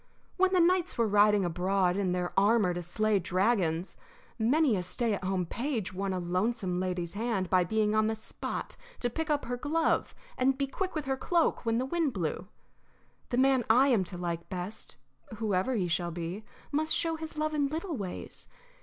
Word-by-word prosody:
When 375 Hz, 0 st, +3 dB
the 370 Hz, -, +3 dB
knights 355 Hz, 0 st, +2 dB
were 230 Hz, -1 st, +3 dB
riding 205 Hz, -1 st, +4 dB
abroad 180 Hz, +1 st, +1 dB
in 195 Hz, -2 st, 0 dB
their 180 Hz, 0 st, -2 dB
armor 205 Hz, -2 st, +4 dB
to 175 Hz, -, -3 dB
slay 210 Hz, +4 st, +1 dB
dragons, 185 Hz, -2 st, 0 dB, 0.4 s
many 260 Hz, +2 st, +3 dB
a 185 Hz, -, -1 dB
stay 220 Hz, +5 st, -1 dB
at 200 Hz, -, -3 dB
home 185 Hz, -1 st, 0 dB
page 230 Hz, -, -3 dB
won 195 Hz, +1 st, -2 dB
a 185 Hz, -, -1 dB
lonesome 180 Hz, +2 st, -1 dB
lady's 180 Hz, -2 st, -2 dB
hand 205 Hz, -4 st, -1 dB
by 185 Hz, -1 st, +5 dB
being 215 Hz, +3 st, +1 dB
on 215 Hz, 0 st, +3 dB
the 220 Hz, -, 0 dB
spot 220 Hz, -, -6 dB, 0.2 s
to 245 Hz, -, -1 dB
pick 320 Hz, +5 st, -3 dB
up 295 Hz, -1 st, +1 dB
her 245 Hz, 0 st, -3 dB
glove 310 Hz, +5 st, 0 dB, 0.2 s
and 265 Hz, +1 st, +3 dB
be 275 Hz, -, +1 dB
quick 370 Hz, +7 st, -4 dB
with 305 Hz, -2 st, -2 dB
her 265 Hz, 0 st, -1 dB
cloak 330 Hz, -3 st, +1 dB
when 225 Hz, 0 st, +2 dB
the 255 Hz, -, 0 dB
wind 310 Hz, -1 st, 0 dB
blew. 175 Hz, 0 st, -3 dB, 0.8 s
The 245 Hz, -, -1 dB
man 265 Hz, -1 st, +4 dB
I 255 Hz, +5 st, +6 dB
am 225 Hz, -7 st, +3 dB
to 175 Hz, 0 st, -7 dB
like 170 Hz, -1 st, -4 dB
best, 185 Hz, +2 st, -5 dB, 0.4 s
whoever 215 Hz, +2 st, 0 dB
he 185 Hz, -5 st, 0 dB
shall 175 Hz, +1 st, 0 dB
be, 170 Hz, +5 st, -5 dB, 0.3 s
must 310 Hz, +2 st, +1 dB
show 330 Hz, -1 st, 0 dB
his 320 Hz, -1 st, -7 dB
love 310 Hz, 0 st, 0 dB
in 290 Hz, -2 st, +2 dB
little 320 Hz, +3 st, -3 dB
ways. 195 Hz, -6 st, -6 dB
215 Hz, 195 wpm, -30 LUFS, 185-270 Hz, 0.8 s, I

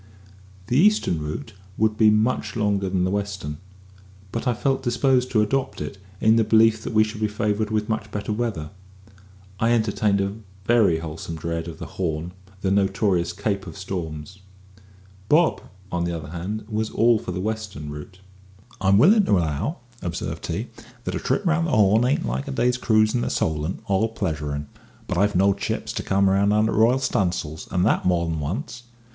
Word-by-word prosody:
The 125 Hz, +6 st, +2 dB
eastern 200 Hz, -, +3 dB
route 75 Hz, +9 st, -5 dB, 0.2 s
would 110 Hz, 0 st, +2 dB
be 110 Hz, 0 st, +5 dB
much 110 Hz, +5 st, +1 dB
longer 100 Hz, -3 st, 0 dB
than 90 Hz, -1 st, 0 dB
the 95 Hz, -, 0 dB
western; 100 Hz, -7 st, -3 dB, 0.7 s
but 115 Hz, +3 st, -3 dB
I 120 Hz, -, +2 dB
felt 135 Hz, +3 st, 0 dB
disposed 125 Hz, 0 st, +2 dB
to 110 Hz, -2 st, +3 dB
adopt 135 Hz, +5 st, -1 dB
it, 75 Hz, +6 st, -6 dB, 0.2 s
in 110 Hz, +1 st, +4 dB
the 115 Hz, -, +4 dB
belief 110 Hz, 0 st, +4 dB
that 115 Hz, -, -5 dB
we 110 Hz, 0 st, +5 dB
should 110 Hz, 0 st, -6 dB
be 110 Hz, -, +2 dB
favoured 105 Hz, 0 st, -1 dB
with 105 Hz, -1 st, -1 dB
much 110 Hz, -1 st, -2 dB
better 105 Hz, +1 st, -3 dB
weather. 105 Hz, -9 st, -3 dB, 0.9 s
I 115 Hz, +1 st, +3 dB
entertained 105 Hz, -3 st, +1 dB
a 100 Hz, 0 st, -1 dB, 0.3 s
very 110 Hz, -8 st, +4 dB
wholesome 80 Hz, +1 st, -6 dB
dread 85 Hz, +1 st, -3 dB
of 80 Hz, -2 st, -7 dB
the -, -, -7 dB
"Horn" 85 Hz, -2 st, -3 dB, 0.3 s
the 95 Hz, -, 0 dB
notorious 95 Hz, -3 st, +1 dB
"Cape 100 Hz, +1 st, -2 dB
of -, -, -9 dB
Storms." 90 Hz, -2 st, -6 dB, 0.9 s
Bob, 160 Hz, +2 st, +4 dB, 0.3 s
on 85 Hz, -1 st, -1 dB
the 85 Hz, -1 st, -2 dB
other 75 Hz, -2 st, -8 dB
hand, 95 Hz, +6 st, -4 dB
was 110 Hz, 0 st, -2 dB
all 115 Hz, 0 st, +3 dB
for 90 Hz, -, -5 dB
the 90 Hz, -, -4 dB
western 100 Hz, -7 st, -4 dB
route. 75 Hz, +6 st, -10 dB, 0.6 s
"I'm 95 Hz, +1 st, +4 dB
willin' 200 Hz, -, +6 dB
to 100 Hz, -, +3 dB
allow," 85 Hz, -, -2 dB, 0.2 s
observed 85 Hz, -2 st, -4 dB
he, -, -, -3 dB, 0.3 s
"that -, -, -3 dB
a -, -, -2 dB
trip 205 Hz, -, -1 dB
round 170 Hz, -1 st, +2 dB
the -, -, -2 dB
Horn 110 Hz, +3 st, +4 dB
ain't 130 Hz, +3 st, +1 dB
like 65 Hz, +2 st, -3 dB
a -, -, -3 dB
day's 125 Hz, -, +1 dB
cruise 110 Hz, -2 st, +3 dB
in 120 Hz, -, +1 dB
the -, -, -1 dB
Solent 80 Hz, +2 st, -1 dB
all 100 Hz, +3 st, +2 dB
pleasuring; 75 Hz, -9 st, -3 dB, 0.4 s
but 90 Hz, -, -2 dB
I've 100 Hz, +1 st, +2 dB
knowed 100 Hz, +2 st, +3 dB
ships -, -, -2 dB
to -, -, -2 dB
come 100 Hz, 0 st, +2 dB
round 100 Hz, +1 st, +3 dB
under 110 Hz, +1 st, +3 dB
r'yal 115 Hz, +4 st, +4 dB
stunsails, 85 Hz, -, -1 dB
and 90 Hz, +1 st, +2 dB
that -, -, +2 dB
more 85 Hz, -2 st, +1 dB
than 80 Hz, -1 st, -2 dB
once. 110 Hz, -, -4 dB
100 Hz, 185 wpm, -23 LUFS, 85-110 Hz, 0.9 s, willin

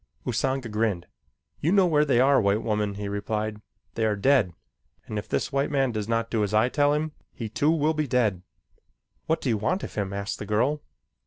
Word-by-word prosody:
Usanga 130 Hz, -2 st, -1 dB
grinned. 105 Hz, -5 st, -1 dB, 0.5 s
"You 160 Hz, -, +1 dB
know 195 Hz, -1 st, +5 dB
where 150 Hz, -3 st, +3 dB
they 130 Hz, -4 st, +3 dB
are, 135 Hz, 0 st, +5 dB
white 100 Hz, +2 st, +1 dB
woman," 105 Hz, -2 st, -1 dB
he 100 Hz, 0 st, -4 dB
replied. 105 Hz, +1 st, -3 dB, 0.3 s
"They 115 Hz, -, -2 dB
are 110 Hz, -1 st, +2 dB
dead, 105 Hz, -2 st, +3 dB, 0.5 s
and 105 Hz, -, -3 dB
if -, -, -8 dB
this -, -, -1 dB
white 140 Hz, 0 st, 0 dB
man 135 Hz, -3 st, +1 dB
does 105 Hz, -2 st, -3 dB
not 115 Hz, 0 st, 0 dB
do 110 Hz, -2 st, +1 dB
as 105 Hz, +1 st, -1 dB
I 110 Hz, +3 st, +4 dB
tell 145 Hz, +1 st, +3 dB
him, 155 Hz, +1 st, -1 dB, 0.2 s
he, 115 Hz, -2 st, -6 dB
too, 145 Hz, +7 st, +1 dB
will 160 Hz, -1 st, +2 dB
be 155 Hz, -1 st, -1 dB
dead." 110 Hz, -7 st, +1 dB, 0.9 s
"What 160 Hz, -, +1 dB
do 130 Hz, -, -1 dB
you 110 Hz, -, +2 dB
want 185 Hz, -, -1 dB
of -, -, -6 dB
him?" 100 Hz, -2 st, -2 dB
asked 100 Hz, +1 st, -4 dB
the 105 Hz, -, -6 dB
girl. 125 Hz, +8 st, +1 dB
115 Hz, 215 wpm, -26 LUFS, 105-140 Hz, 0.9 s, know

